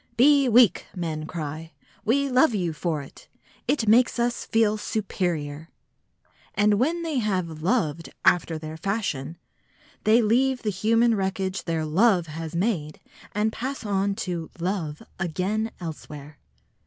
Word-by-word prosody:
"Be 275 +1 +5
weak!" 235 -1 +5
men 160 -3 -3
cry; 160 0 -6 0.3
"we 275 +6 +2
love 255 -1 +4
you 175 -5 -1
for 155 -2 -2
it. 135 - -15 0.4
It 235 -7 +1
makes 235 +2 +4
us 240 0 0
feel 220 -2 +2
superior!" 170 -8 -3 0.9
And 205 0 +3
when 335 +7 +1
they 315 -5 -1
have 185 -8 -2
"loved" 165 - 0 0.2
after 165 -2 +3
their 155 0 -7
fashion, 170 -5 -2 0.7
they 220 +2 +5
leave 250 +4 +2
the 210 - 0
human 225 +5 +3
wreckage 190 -1 -2
their 165 -2 -1
"love" 180 +3 +3
has 160 +1 -6
made 170 -6 -1 0.3
and 215 +1 0
pass 265 0 -4
on 200 -1 0
to 170 -3 -4
"love" 170 -4 -3 0.2
again 190 +5 -1
elsewhere. 150 -3 -8
190 Hz, 135 wpm, -25 LUFS, 160-225 Hz, 0.9 s, Be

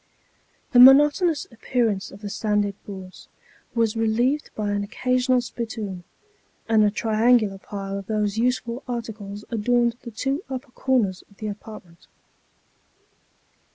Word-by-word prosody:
The 245 - +5
monotonous 290 +5 +6
appearance 225 -3 -1
of 195 - -13
the 205 - -5
sanded 210 -1 0
boards 190 -2 -10 0.5
was 230 -2 +1
relieved 235 +6 +1
by 210 -1 -2
an 205 0 -1
occasional 250 +4 +1
spittoon; 215 -7 -6 0.6
and 220 -1 +4
a 210 - +4
triangular 220 -1 +2
pile 195 -1 -5
of 195 - -11
those 210 -2 0
useful 245 +1 -1
articles 215 -4 -6
adorned 235 +1 +1
the 240 - -8
two 270 - -2
upper 260 0 -6
corners 230 -9 0
of 200 - -23
the 215 -1 -4
apartment. 190 -4 -11
220 Hz, 125 wpm, -24 LUFS, 205-245 Hz, 0.6 s, monotonous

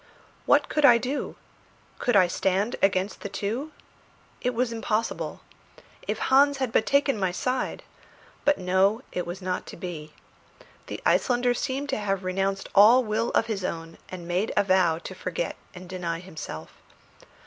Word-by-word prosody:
What - - +4
could 300 - -1
I 240 -4 +8
do? 260 +5 -3 0.6
Could 245 - +1
I 190 -2 +7
stand 195 +5 0
against 195 +1 +1
the 200 - -5
two? 225 +10 -3 0.7
It 250 -1 -1
was 245 0 0
impossible? 225 -1 -2 0.7
If - - -1
Hans 280 +1 +4
had 260 -4 -1
but 220 - +2
taken 280 -4 +2
my 190 -2 +1
side! 255 +8 -2 0.6
But 290 0 +3
no, 190 +6 +2
it 180 - -3
was 180 +2 -6
not 185 0 -3
to - - -9
be. 160 -4 -7 0.7
The - - -5
Icelander 245 -1 +3
seemed 275 +3 -3
to - - -1
have 195 -2 -1
renounced 195 +1 -1
all 225 +6 +7
will 220 +1 -1
of - - +3
his 215 -4 -3
own 165 -2 -5
and 175 -2 -8
made 180 +5 0
a 205 - +5
vow 185 -4 +3
to - - -8
forget - - -3 0.2
and 180 0 -10
deny 175 -2 -3
himself. 155 - -8
200 Hz, 160 wpm, -26 LUFS, 185-245 Hz, 0.7 s, I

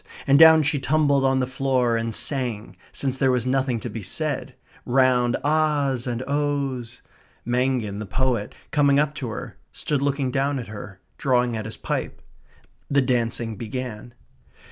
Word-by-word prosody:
And 140 +1 +5
down 160 -1 +8
she 145 0 0
tumbled 140 0 +2
on 135 0 +2
the - - +1
floor, 130 -2 0
and 115 -1 -2
sang, 125 -7 -2 0.2
since 135 -1 -2
there 135 - +3
was 125 -2 +1
nothing 130 -2 0
to - - -4
be 115 - -6
said, 95 - -3 0.3
round 125 -1 +3
ah's 145 -4 +1
and 120 0 -2
oh's. 140 -4 -2 0.4
Mangin, 120 -4 0
the 105 - -6
poet, 125 -2 -1 0.2
coming 140 -2 +4
up 150 0 +1
to 140 -4 -5
her, 110 - -7
stood 145 -2 -2
looking 140 -2 0
down 140 +2 0
at 120 -4 -6
her, 105 -2 -9 0.2
drawing 125 -3 +1
at 110 -1 -4
his 110 - -7
pipe. - - -3 0.7
The 140 -1 +3
dancing 115 -3 -1
began. 120 0 -6
130 Hz, 160 wpm, -24 LUFS, 120-140 Hz, 0.7 s, down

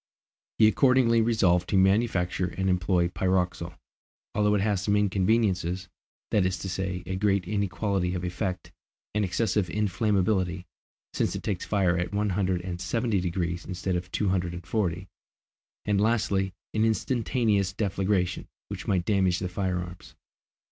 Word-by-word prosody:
He 110 - +6
accordingly 125 -1 +4
resolved 95 -6 +2
to 100 - +2
manufacture 95 -2 +2
and 95 0 +1
employ 90 -1 +2
pyroxyle, 90 -2 -1 0.6
although 105 0 +2
it 100 - +1
has 100 -2 +1
some 100 +1 +1
inconveniences, 95 -2 +1 0.4
that 105 - +3
is 90 0 0
to 95 - -5
say, 95 -1 -3
a 95 - -3
great 100 -2 +1
inequality 100 -2 -1
of 90 - -4
effect, 90 +1 -3 0.4
an 105 0 +1
excessive 100 0 0
inflammability, 95 -3 0 0.5
since - - 0
it - - -5
takes 100 -4 -2
fire 90 -4 +1
at 90 +3 -3
one 105 0 +1
hundred 95 -1 0
and 90 -1 -5
seventy 110 +2 0
degrees 85 -1 -2
instead 90 0 -3
of 90 +1 -4
two 105 - 0
hundred 90 -2 -1
and 85 0 -9
forty, 95 -4 -1 0.8
and 100 -1 +2
lastly, 100 -4 +1 0.2
an 110 - +1
instantaneous 110 -3 +1
deflagration 95 -2 -1 0.2
which - - -6
might 90 -3 +1
damage 95 -3 +2
the 90 0 -3
firearms. 90 -1 -4
95 Hz, 150 wpm, -27 LUFS, 90-105 Hz, 0.8 s, He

